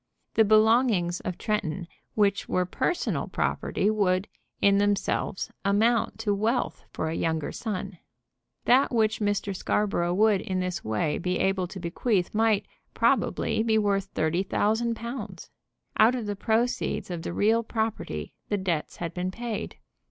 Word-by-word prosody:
The 220 - +5
belongings 215 -4 +4
of 180 - -4
Tretton, 190 -5 -2 0.3
which 200 -2 +1
were 180 0 +1
personal 340 - -1
property, 200 - -1
would, 195 -2 +1 0.3
in 200 0 +4
themselves, 205 -2 0
amount 215 +4 +2
to 210 -2 +1
wealth 225 +5 -1
for - - -3
a 160 - -2
younger 160 -2 -1
son. 195 -5 -5 0.7
That 260 +3 +4
which 220 -3 +2
Mr. 205 -1 -1
Scarborough 180 -3 0
would 210 -1 +4
in 185 -1 -2
this 180 -1 -2
way 110 +8 -1
be 180 +1 -1
able 190 -1 +1
to 190 - -8
bequeath 180 +2 0
might, 215 -2 +2 0.3
probably, 220 -1 +2
be 220 -1 +2
worth 200 -2 +1
thirty 160 +3 +1
thousand 220 +4 +1
pounds. 225 -6 -7 0.5
Out 225 +4 +6
of 240 -4 -3
the 205 0 -2
proceeds 225 -1 0
of 175 -2 -4
the 170 - -4
real 220 +5 +3
property 220 - -3 0.2
the 205 - +1
debts 175 -5 -2
had 170 -2 -5
been 180 +1 -2
paid. 230 +2 -5
205 Hz, 150 wpm, -27 LUFS, 180-220 Hz, 0.7 s, Out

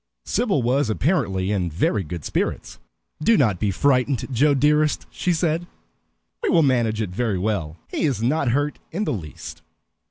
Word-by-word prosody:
Sybil 205 - +1
was 125 +1 +1
apparently 105 - 0
in 95 -4 0
very 95 +5 0
good 80 -1 -7
spirits. - - -3 0.4
"Do 225 +9 +4
not 105 -10 +2
be 105 - +1
frightened, 130 +3 +1
Joe 140 +4 +3
dearest," 150 +2 +2
she 180 - -1
said. 170 0 0 0.7
"We 445 - 0
will 165 - +4
manage 115 -5 +1
it 95 - -5
very 105 0 -1
well. 90 -5 -2
He - - -2
is 135 -7 0
not 140 +2 +1
hurt 145 +4 0
in 195 +6 -2
the - - -1
least." 80 -9 -8
125 Hz, 165 wpm, -23 LUFS, 100-150 Hz, 0.7 s, Do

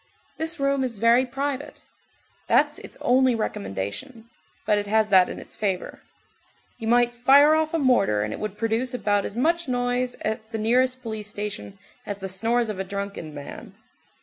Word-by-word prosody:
This 320 0 -2
room 275 -1 +1
is 240 -4 -3
very 235 +4 +4
private. 275 +2 -4 0.6
That's - - +3
its - - -11
only 255 0 +3
recommendation, 100 - -5 0.3
but 210 - +3
it 205 - -4
has 215 +1 +2
that 185 -2 +6
in - - -6
its - - -11
favor. 195 -4 -3 0.8
You 225 - -4
might 240 +1 +3
fire 275 +5 +6
off 315 0 +1
a 330 - 0
mortar 240 - +2
and 105 +1 -3
it - - -7
would 210 -1 -5
produce 230 +3 -1
about 205 -4 +1
as 205 - -5
much 335 +5 +1
noise 245 0 -1
at 220 0 -3
the 225 - -2
nearest 255 +4 +1
police 220 -2 -4
station 210 -1 -5 0.3
as 205 - -5
the 195 -1 -5
snores 230 +5 0
of 205 -3 -4
a - - 0
drunken 200 -4 -5
man. 145 -1 -9
230 Hz, 175 wpm, -24 LUFS, 205-255 Hz, 0.8 s, that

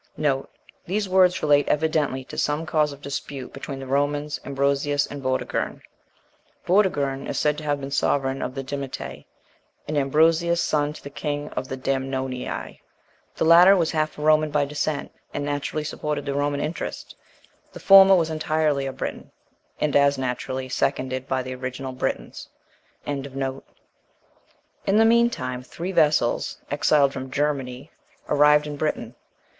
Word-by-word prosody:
These 200 +3 -1
words 185 -1 +3
relate 145 -1 +4
evidently 150 -3 0
to - - -10
some 150 +2 -1
cause 155 -2 +1
of 140 +1 -12
dispute 140 -1 -6
between 135 0 -6
the 135 - -7
Romans, 145 +2 -1
Ambrosius, 140 +1 0
and 145 -1 -8
Vortigern. 130 0 -2 0.8
Vortigern 145 -8 +1
is - - -3
said 150 -1 +2
to - - -9
have 145 -1 0
been 135 0 -6
sovereign 135 -1 0
of 130 - -4
the 135 - -4
Dimetae, 140 0 -6 0.6
and 155 - -3
Ambrosius 160 +4 +3
son 150 -3 +1
to - - -13
the 140 - -8
king 145 0 -3
of 130 - -4
the 130 - -5
Damnonii. 130 -1 -3 0.6
The - - 0
latter 175 +4 +8
was 165 -3 +1
half 155 -1 -1
a 150 - -5
Roman 155 0 +4
by 145 -1 +1
descent, 150 +1 -3 0.2
and 145 - -2
naturally 145 +1 -2
supported 150 -1 -3
the 140 - -2
Roman 145 0 0
interest: 165 +2 -5 0.6
the - - -10
former 195 0 +8
was 165 -3 +1
entirely 155 -3 0
a 135 - -4
Briton, - - -6 0.5
and 150 - 0
as 140 0 +4
naturally 130 0 -3
seconded 130 0 -1
by 130 -1 -1
the 130 0 -5
original 130 +1 -5
Britons. 125 - -4 0.6
In 145 -1 -2
the 135 -1 -4 1.4
meantime, 225 - +2
three 170 +8 -6
vessels, 150 -8 +2
exiled 145 -1 +3
from 130 0 -6
Germany, 135 -1 -2 0.4
arrived 150 0 +5
in 145 -1 -6
Britain. 140 -6 -2
145 Hz, 150 wpm, -24 LUFS, 135-155 Hz, 1.4 s, latter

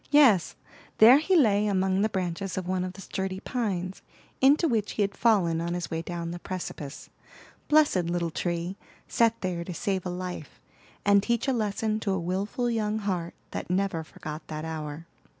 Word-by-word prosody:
Yes, 260 - +5 0.4
there 240 +6 +9
he 370 +5 +2
lay 210 - +4
among 190 -1 +1
the 215 - +2
branches 185 0 -3
of 185 -1 -3
one 185 0 0
of 185 0 -4
the 195 - -11
sturdy 190 0 -3
pines, 195 -6 -3 0.4
into 285 +5 +5
which 220 -6 0
he 210 - +1
had 200 0 -2
fallen 180 -8 +3
on 170 +1 -2
his 175 - -4
way 165 0 -1
down 170 0 -5
the 175 - -6
precipice. 155 -6 -6 0.6
Blessed 295 - +4
little 170 -1 -1
tree! 175 +3 -2 0.3
set 230 -1 +2
there 180 -2 -2
to 175 0 -6
save 190 -2 -1
a 180 - -3
life, 180 -4 -6 0.5
and 200 0 +5
teach 235 +4 0
a 270 - +2
lesson 215 -1 -1
to 200 -3 -1
a 190 - 0
wilful 195 +8 -2
young 220 -2 0
heart 185 -5 -3 0.2
that - - -5
never 185 -3 0
forgot 155 0 -8
that 155 0 -5
hour. 155 0 -5
190 Hz, 185 wpm, -27 LUFS, 175-215 Hz, 0.6 s, there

